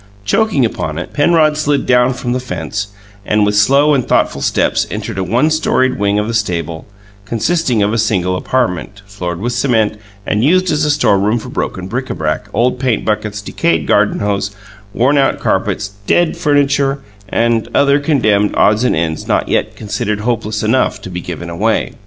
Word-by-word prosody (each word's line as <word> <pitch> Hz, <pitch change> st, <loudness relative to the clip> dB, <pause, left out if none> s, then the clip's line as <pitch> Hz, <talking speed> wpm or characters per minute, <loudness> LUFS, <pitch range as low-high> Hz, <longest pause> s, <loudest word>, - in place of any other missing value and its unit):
Choking 140 Hz, -, +2 dB
upon 80 Hz, -8 st, -3 dB
it, 90 Hz, -, -6 dB
Penrod 155 Hz, 0 st, +3 dB
slid 145 Hz, -2 st, 0 dB
down 125 Hz, +1 st, +3 dB
from 125 Hz, -1 st, -3 dB
the 130 Hz, -, -1 dB
fence, 100 Hz, -3 st, -4 dB, 0.4 s
and 105 Hz, +1 st, +2 dB
with 105 Hz, 0 st, 0 dB
slow 140 Hz, +8 st, +4 dB
and 135 Hz, -3 st, +2 dB
thoughtful -, -, 0 dB
steps -, -, +1 dB
entered 105 Hz, +1 st, -5 dB
a -, -, 0 dB
one 120 Hz, -, +1 dB
storied 130 Hz, -6 st, +1 dB
wing 100 Hz, 0 st, +1 dB
of 105 Hz, 0 st, 0 dB
the 115 Hz, -, -3 dB
stable, 85 Hz, -7 st, -2 dB, 0.4 s
consisting 120 Hz, -, 0 dB
of 105 Hz, +2 st, 0 dB
a 115 Hz, -, 0 dB
single 95 Hz, -4 st, 0 dB
apartment, 100 Hz, -3 st, -2 dB
floored 90 Hz, -4 st, -5 dB
with 120 Hz, +4 st, -2 dB
cement 110 Hz, -4 st, +1 dB, 0.3 s
and 105 Hz, +1 st, 0 dB
used 185 Hz, +5 st, +3 dB
as 150 Hz, 0 st, +1 dB
a -, -, 0 dB
storeroom 110 Hz, -6 st, +2 dB
for 115 Hz, -, -7 dB
broken 95 Hz, -, -4 dB
bric 125 Hz, +6 st, -4 dB
a -, -, -3 dB
brac, 80 Hz, +6 st, -2 dB
old 125 Hz, +4 st, +1 dB
paint 130 Hz, -4 st, 0 dB
buckets, 105 Hz, -1 st, -2 dB
decayed 80 Hz, -6 st, 0 dB
garden -, -, +2 dB
hose, 100 Hz, -1 st, -1 dB, 0.4 s
worn 130 Hz, +7 st, +2 dB
out 135 Hz, -, +1 dB
carpets, 100 Hz, 0 st, -1 dB, 0.2 s
dead 175 Hz, -2 st, +2 dB
furniture, 140 Hz, -1 st, +1 dB, 0.3 s
and 115 Hz, 0 st, +1 dB
other 140 Hz, 0 st, +4 dB
condemned 110 Hz, -9 st, +1 dB
odds 105 Hz, +3 st, +3 dB
and 125 Hz, -, +2 dB
ends 80 Hz, -1 st, -2 dB
not -, -, 0 dB
yet -, -, 0 dB
considered 105 Hz, 0 st, -3 dB
hopeless 110 Hz, -2 st, -2 dB
enough 115 Hz, +4 st, +1 dB
to 95 Hz, -, -9 dB
be 90 Hz, 0 st, -4 dB
given 85 Hz, -1 st, -6 dB
away. 100 Hz, +7 st, -1 dB
110 Hz, 180 wpm, -15 LUFS, 100-135 Hz, 0.4 s, slow